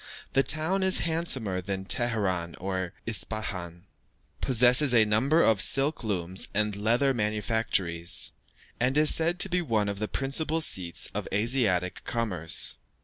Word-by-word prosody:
The 135 - +4
town 160 +7 +1
is 190 0 +4
handsomer 135 - -1
than 95 0 -5
Teheran 95 -8 0
or 95 -1 -4
Ispahan, 100 -6 -5 0.6
possesses 125 +2 +3
a 110 -2 +5
number 130 +10 +2
of 110 -3 +2
silk 140 +4 +2
looms 95 -3 -2
and 105 -1 0
leather 120 +7 +1
manufactories, 105 -6 0 0.5
and 130 +4 +1
is 150 0 +5
said 170 +2 +1
to - - +7
be 180 0 0
one 110 -9 -1
of 100 -1 -4
the 105 - -2
principal 150 +6 0
seats 90 - 0
of - - -4
Asiatic 105 -4 0
commerce. 95 -10 -2
110 Hz, 140 wpm, -27 LUFS, 95-135 Hz, 0.6 s, to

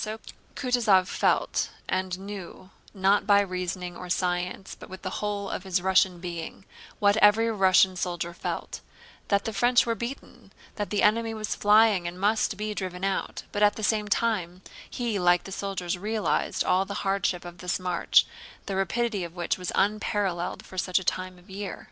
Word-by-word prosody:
Kutúzov 235 -8 +3
felt - - +1 0.2
and 185 -1 -1
knew—not 195 +1 -2
by 200 -1 +6
reasoning 180 -2 -3
or 180 - -8
science 180 +1 -2
but - - -12
with 190 0 -10
the 185 - -4
whole 205 -1 -2
of - - -4
his 190 -1 0
Russian 185 -1 +3
being—what 180 +4 -3
every 220 +2 +5
Russian 190 -2 +4
soldier 175 -1 -3
felt: - - -5 0.5
that 200 -1 +1
the 225 - -3
French 240 +5 +4
were 230 - +1
beaten, 235 +5 -7 0.2
that 205 -1 -3
the 205 - 0
enemy 225 +1 +2
was 215 -1 -3
flying 210 -3 +4
and 175 +1 -6
must 210 0 +1
be 210 +1 -3
driven 185 -2 -5
out; 195 -1 -2
but 205 - -3
at 205 0 +5
the 215 - -6
same 210 0 +1
time 190 -4 -1 0.3
he 235 -5 -2
like 175 0 +4
the 195 - -9
soldiers 185 -2 -3
realized 215 +2 0
all 185 +1 +2
the 200 +1 -5
hardship 195 -2 0
of 175 -1 -10
this 180 0 -1
march, 180 -2 +3 0.4
the 195 - -3
rapidity 200 +2 0
of 170 0 -8
which 175 +1 -1
was 180 - -3
unparalleled 200 -3 0
for 185 - -6
such 185 0 +1
a 190 - 0
time 185 0 -2
of 180 - -19
the 190 - -13
year. 200 0 -5
195 Hz, 175 wpm, -27 LUFS, 180-210 Hz, 0.5 s, by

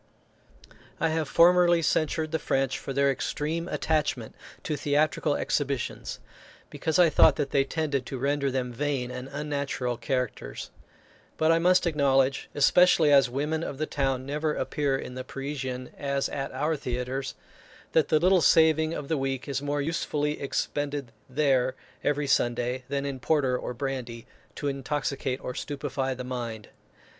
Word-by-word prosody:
I 165 - +2
have 160 -2 -1
formerly 175 0 +5
censured 155 0 0
the 160 - 0
French 135 -2 0
for - - -6
their 140 +1 +3
extreme 155 +5 -2
attachment 150 -10 -1 0.3
to 155 - -2
theatrical 145 0 +1
exhibitions, 140 -4 -2 0.5
because 160 +1 -1
I 180 -1 +7
thought - - +6
that 140 - -2
they 140 - +3
tended 140 -3 -2
to 135 - -4
render 140 +1 0
them 125 -2 -2
vain 130 -1 -2
and 125 +1 -6
unnatural 140 -4 -2
characters; 120 - -3 0.7
but 160 +1 +3
I 165 - +4
must 180 +1 +4
acknowledge, 140 -4 +2
especially 155 +1 +5
as 135 -3 +6
women 150 +5 -1
of 140 - -5
the 155 - -1
town 135 -3 -1
never 150 +2 -1
appear 135 +1 0
in 125 - -7
the 130 0 -5
Parisian 130 -2 -5
as 140 -1 -1
at 135 -1 -4
our 150 +5 0
theatres, 130 0 -3 0.6
that 160 - +3
the 155 - +4
little 185 +2 +4
saving 160 0 +4
of 145 - -5
the 160 -2 0
week 135 0 -2
is 140 -1 -2
more 145 0 -1
usefully 150 -2 -1
expended 140 -1 -2 0.2
there 130 -2 +2 0.3
every 145 0 +1
Sunday 125 -1 0
than 140 0 -1
in 140 -2 -4
porter 135 -2 +1
or 125 0 -4
brandy, 125 -3 -4 0.3
to 145 - -3
intoxicate 140 -1 -2
or 125 - -4
stupify 135 -2 -3
the 125 - -5
mind. 120 -4 -5
140 Hz, 155 wpm, -27 LUFS, 130-150 Hz, 0.7 s, I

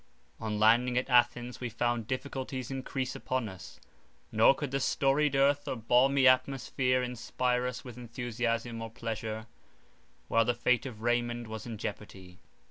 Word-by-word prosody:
On 110 -1 -3
landing 120 +3 +4
at 125 +1 -1
Athens 120 0 +2
we 125 - -2
found 120 0 -1
difficulties 130 0 -4
encrease 130 -1 -3
upon 130 -3 -2
us: 95 -3 -11 0.5
nor 110 +5 +5
could 140 -1 -4
the 135 - 0
storied 140 +2 +2
earth 140 +1 +3
or - - -1
balmy 130 +4 +4
atmosphere 130 -1 +2
inspire 125 +1 -1
us 125 0 -5
with 125 -2 -10
enthusiasm 115 -1 -3
or 115 - -5
pleasure, 110 -1 -5 0.8
while 115 - +3
the 120 - +1
fate 125 +2 +1
of 110 -4 -9
Raymond 120 0 0
was 110 +1 -7
in 115 -2 -5
jeopardy. 95 -3 -7
120 Hz, 150 wpm, -30 LUFS, 115-130 Hz, 0.8 s, nor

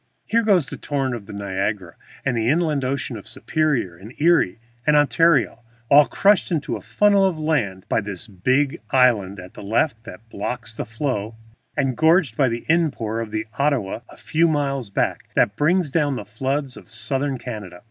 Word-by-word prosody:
Here 230 +1 +2
goes 200 -8 +3
the - - -8
torrent 135 -3 -2
of 110 -5 -7
Niagara 100 -2 -3 0.3
and 125 - +1
the 115 0 +1
inland 155 -2 +1
ocean 130 -2 -2
of 105 - -11
Superior 130 - -1
and 105 +8 -13
Erie 160 - +3 0.3
and 150 - +5
Ontario, 145 - +3 0.3
all 145 -1 +8
crushed 200 - +3
into 155 -4 -1
a - - -7
funnel 205 -1 +3
of 190 -4 +1
land 130 -13 -1
by - - +1
this 100 0 -6
big 130 - 0
island 110 -7 +3
at 90 0 -11
the - - -10
left 115 +3 0
that 110 +5 -11
blocks 115 +2 -5
the - - -5
flow, 115 -3 -3 0.4
and 135 -3 +1
gorged 160 -5 +3
by 130 0 +3
the 115 0 -4
in 165 0 +3
pour 110 -4 -4
of 115 -1 -4
the 110 0 -3
Ottawa 140 -9 0
a - - -14
few 165 +2 +1
miles 140 -6 -1
back 100 - -1
that 100 - +3
brings 160 - +2
down 145 -2 +1
the 105 - -6
floods 130 +6 -3
of - - -14
southern 135 -1 -2
Canada. 105 -7 -7
130 Hz, 185 wpm, -22 LUFS, 110-150 Hz, 0.4 s, all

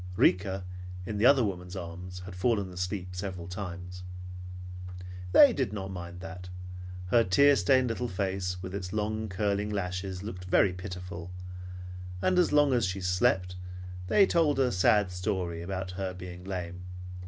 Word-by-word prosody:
Rika, 95 +1 +3 0.4
in 105 +1 -3
the 115 - +7
other 140 -3 +7
woman's 90 -2 -3
arms, 90 0 -6
had 90 0 -8
fallen 100 -1 +1
asleep 90 +1 -2
several 90 -2 -4
times. 90 -1 -6 1.3
They 280 - +9
did 130 - 0
not 95 -2 -4
mind 90 -1 -6
that; 90 -1 -7 0.6
her 115 +3 +6
tear 140 +10 +6
stained 125 +5 +4
little 120 +2 -1
face 95 -2 -2
with 95 0 -5
its 95 -2 -4
long, 110 0 -1
curling 100 +2 0
lashes 95 -1 -2
looked 90 -4 -6
very 90 0 +4
pitiful, 90 -1 -6 0.9
and 180 - +3
as 180 - +4
long 145 -2 +5
as 120 -3 +3
she 95 +1 -2
slept 90 0 +2 0.5
they 200 - +6
told 160 -6 +3
a 130 -2 +3
sad 95 +1 +4
story, 90 -2 -2
about 95 +1 -3
her 95 0 -3
being 90 -1 -8
lame. 90 -1 -4
95 Hz, 155 wpm, -30 LUFS, 90-105 Hz, 1.3 s, They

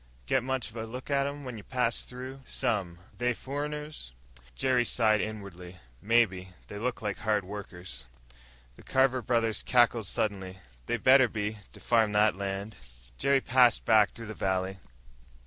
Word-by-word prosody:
"Get 130 - +2
much 130 -2 -2
of 115 - -11
a 110 0 -4
look 125 +5 -7
at 140 0 +2
'em 145 0 -6
when 125 -3 -6
ye - - -8
passed 125 +1 -1
through?" 130 +2 -8
"Some." 95 -8 -1 0.2
"They 125 0 0
furriners?" 150 - -5 0.4
Jerry 130 -2 +2
sighed 110 -3 +2
inwardly. 95 -4 -7 0.2
"Maybe. 100 -5 +2 0.2
They 105 - -6
look 125 0 -3
like 105 -2 -2
hard 105 -2 +1
workers." 90 -10 -7 0.7
The - - -14
Carver 130 -1 +2
brothers 115 -2 +1
cackled 120 -4 +3
suddenly. 95 -3 -2 0.3
"They 120 - 0
better 130 +2 +6
be! 105 -1 -3
To - - -12
farm 110 -3 +2
that 105 -1 +4
land." 100 +2 -4 0.4
Jerry 140 0 +3
passed 125 -3 +4
back 110 -3 +5
through 115 - -10
the 110 - -6
valley. 95 -1 -1
110 Hz, 160 wpm, -29 LUFS, 100-125 Hz, 0.7 s, better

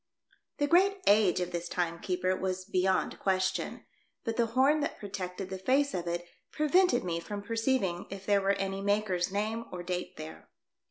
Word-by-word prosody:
The 290 - +2
great 380 +6 +4
age 205 -3 +5
of 180 - -2
this 175 0 -4
time 170 -2 -1
keeper 185 +1 0
was 185 0 -3
beyond 190 -1 +1
question, 190 0 -1 0.4
but 230 -3 -2
the 235 0 +2
horn 285 +4 +5
that 290 - -2
protected 190 -2 -5
the 190 - -4
face 275 +8 +2
of 175 -1 -3
it 175 0 -2 0.3
prevented 305 -2 +3
me 170 -2 -2
from 205 +3 -6
perceiving 225 -5 0
if 195 0 -8
there 200 -1 +3
was 195 +1 +2
any 195 0 -2
maker's 200 -3 +1
name 215 +3 -2
or 180 -1 -5
date 180 0 -4
there. 155 +1 -9
195 Hz, 175 wpm, -30 LUFS, 180-225 Hz, 0.4 s, age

